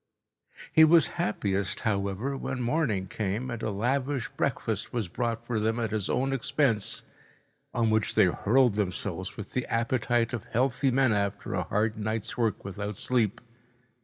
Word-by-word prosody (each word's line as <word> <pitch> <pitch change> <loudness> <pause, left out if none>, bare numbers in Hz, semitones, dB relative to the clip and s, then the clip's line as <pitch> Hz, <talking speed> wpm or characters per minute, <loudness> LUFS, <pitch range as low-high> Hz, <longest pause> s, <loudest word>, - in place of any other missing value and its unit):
He 160 - +8
was 160 -4 +6
happiest, 100 -2 -1
however, 100 +5 -1
when 130 -1 -4
morning 120 -6 0
came 105 +6 -3
and 115 -1 -5
a - - -1
lavish 130 +5 -1
breakfast - - -2
was 115 -6 -2
brought 115 +4 -2
for 120 -2 -1
them 110 +2 0
at 115 -2 -1
his 105 -3 -1
own 135 +2 +1
expense, 120 -4 +1 0.7
on 115 -2 +1
which 110 -2 +1
they - - +6
hurled 125 +1 +3
themselves 95 -1 -3
with 105 - -7
the 125 - -2
appetite 115 0 +1
of 115 - -4
healthy 130 +2 +1
men 130 -2 +3
after 100 +1 -1
a 90 -3 -1
hard 110 +3 0
night's 110 +1 -3
work 115 -5 -1
without 100 0 -5
sleep. 115 -5 0
115 Hz, 160 wpm, -28 LUFS, 105-125 Hz, 0.7 s, He